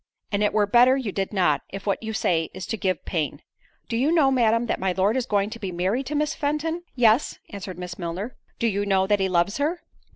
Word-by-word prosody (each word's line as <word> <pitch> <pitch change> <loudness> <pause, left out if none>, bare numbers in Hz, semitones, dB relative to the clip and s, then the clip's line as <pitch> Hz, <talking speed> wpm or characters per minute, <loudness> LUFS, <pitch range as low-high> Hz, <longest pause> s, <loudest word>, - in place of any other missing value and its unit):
"And 200 0 0
it 210 - +2
were 210 -1 +3
better 245 +5 +5
you 245 -7 -3
did 195 0 -2
not, 175 -8 +2
if 195 0 -7
what 200 - 0
you 220 -1 -4
say 170 -6 0
is 185 - -5
to - - -2
give 185 -5 -2
pain. 160 -5 -2 0.4
Do 230 - -3
you 265 +7 +2
know, 305 -5 +4
Madam, 230 -2 +3
that - - -1
my 190 -1 0
Lord 195 +5 +2
is 260 -1 -1
going 205 0 +1
to 230 - -7
be 195 -4 -4
married 190 +10 -1
to 300 - -3
Miss 300 +1 +1
Fenton?" 310 +3 -1
"Yes," 235 +1 +3
answered 190 -3 -7
Miss 180 0 -7
Milner. 180 +7 -4 0.2
"Do - - -1
you 205 -3 +1
know 195 -2 +2
that 205 +1 +2
he 190 0 +1
loves 175 +3 +1
her?" 310 +5 -1
205 Hz, 240 wpm, -24 LUFS, 190-250 Hz, 0.4 s, better